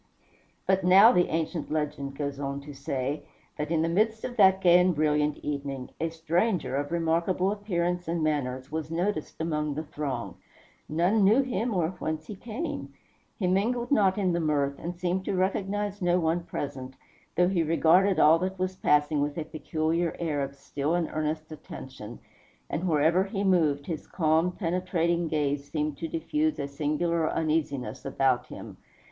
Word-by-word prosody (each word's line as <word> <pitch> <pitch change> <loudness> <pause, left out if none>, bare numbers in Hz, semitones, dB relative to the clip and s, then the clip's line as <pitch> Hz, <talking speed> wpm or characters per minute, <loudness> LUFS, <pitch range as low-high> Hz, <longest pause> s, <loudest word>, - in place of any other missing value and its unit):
But 190 0 +2
now, 195 +6 +8
the 180 -7 +3
ancient 160 +1 -2
legend 145 -3 -2
goes 140 -2 -3
on 140 0 -3
to 145 +1 -10
say, 135 +1 -3 0.4
that 150 - -2
in 160 -1 +1
the - - +1
midst 220 +6 +1
of 245 - -4
that 190 -2 +6
gay 180 -1 +6
and 180 -1 +3
brilliant 150 -1 +1
evening, 140 -3 -4
a 165 - 0
stranger 165 - 0
of 145 +2 -2
remarkable 170 +3 +1
appearance 180 -4 -2
and 165 -1 -1
manners 130 -3 -1
was 155 -1 -3
noticed 175 0 -2
among 150 -3 -1
the 155 - -3
throng. 150 -3 -4 0.5
None 180 +7 +2
knew 220 +8 +5
him, 240 -2 -2
or 165 -3 +1
whence 155 0 -3
he 210 - -7
came. 235 - -5 0.5
He 200 - -1
mingled 235 +7 +1
not 200 -8 +4
in 185 -4 +1
the 170 - +1
mirth, 145 -3 0
and 175 +2 -5
seemed 180 +1 -1
to - - -1
recognize 200 +2 -1
no 175 0 +3
one 165 +1 0
present, 130 -5 -5 0.4
though 180 0 +4
he 185 -3 +1
regarded 165 +4 +4
all 160 +2 +6
that 190 +2 -2
was 185 0 -2
passing 150 -3 +2
with 145 +1 -2
a 160 - -1
peculiar 160 +2 -1
air 155 -4 -1
of 140 0 -4
still 145 +3 -2
and 175 -2 -1
earnest 155 0 -2
attention; 130 -6 -9 0.5
and 170 +5 -1
wherever 160 +4 +3
he 200 0 -3
moved, 155 -7 +2
his 160 -2 -5
calm, 160 +1 +2
penetrating 175 -2 0
gaze 145 -2 -1
seemed 150 -1 -2
to 165 - -3
diffuse 300 - -1
a 140 - -3
singular 155 +3 0
uneasiness 155 -5 -1
about 135 -2 +1
him. - - -9
165 Hz, 170 wpm, -27 LUFS, 150-185 Hz, 0.5 s, now